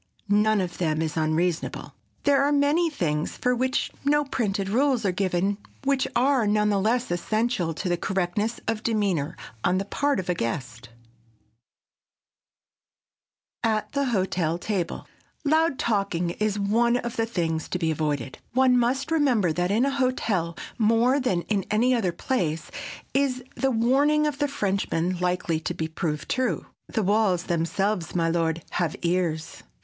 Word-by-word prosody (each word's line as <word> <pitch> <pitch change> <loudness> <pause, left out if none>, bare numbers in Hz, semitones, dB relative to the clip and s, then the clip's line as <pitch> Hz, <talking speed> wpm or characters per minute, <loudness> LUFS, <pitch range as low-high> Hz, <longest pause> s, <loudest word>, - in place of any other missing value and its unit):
None 210 0 +3
of 175 -1 -5
them 155 -3 +1
is 160 -1 -2
unreasonable. 160 +2 -1 0.3
There 280 -1 +4
are 285 +1 +2
many 295 +4 +3
things 155 - -2
for 250 - +1
which 255 +1 0
no 295 +1 +3
printed 205 -7 -1
rules 250 +2 +2
are 190 - +3
given 190 +2 0 0.2
which 275 -1 +1
are 255 -2 +3
none 210 0 +2
the 200 -1 +2
less 230 +2 +1
essential 215 0 0
to 185 - -3
the 175 -1 +1
correctness 190 +5 -1
of 225 -1 -1
demeanor 195 -10 0 0.3
on 180 +1 +2
the 195 - -1
part 285 +5 0
of 185 - -4
a 180 - +2
guest. 115 -5 -4 2.7
[Sidenote: 220 -1 +3
AT 215 - -6
THE 280 -1 0
HOTEL 185 -8 0
TABLE] 180 -2 -3 0.4
Loud 315 -1 +3
talking 195 -6 0
is 210 +2 -1
one 230 +4 +2
of 240 -1 -4
the 225 0 0
things 165 -7 -2
to - - -1
be 165 -2 0
avoided. 145 -5 -2
One 255 0 +4
must 265 +5 0
remember 250 - +3
that 175 +2 0
in 220 +6 +3
a 275 - +1
hotel 225 -11 0 0.2
more 230 +5 +3
than 190 -10 0
in 200 -3 0
any 235 +5 +3
other 215 -8 +1
place 170 -7 -2 0.4
is 265 -2 +1
the 270 - 0
warning 275 +6 +3
of 295 -1 -2
the 290 - +2
Frenchman 190 -8 -1
likely 180 -2 0
to 160 - -4
be 160 - -2
proved 155 -2 -3
true,—"The 250 -3 -2
walls 195 -3 +2
themselves, 175 +1 -1
my 165 -1 +2
lord, 165 -1 0
have 170 -3 -1
ears!" 170 -3 -1
205 Hz, 155 wpm, -25 LUFS, 175-250 Hz, 2.7 s, There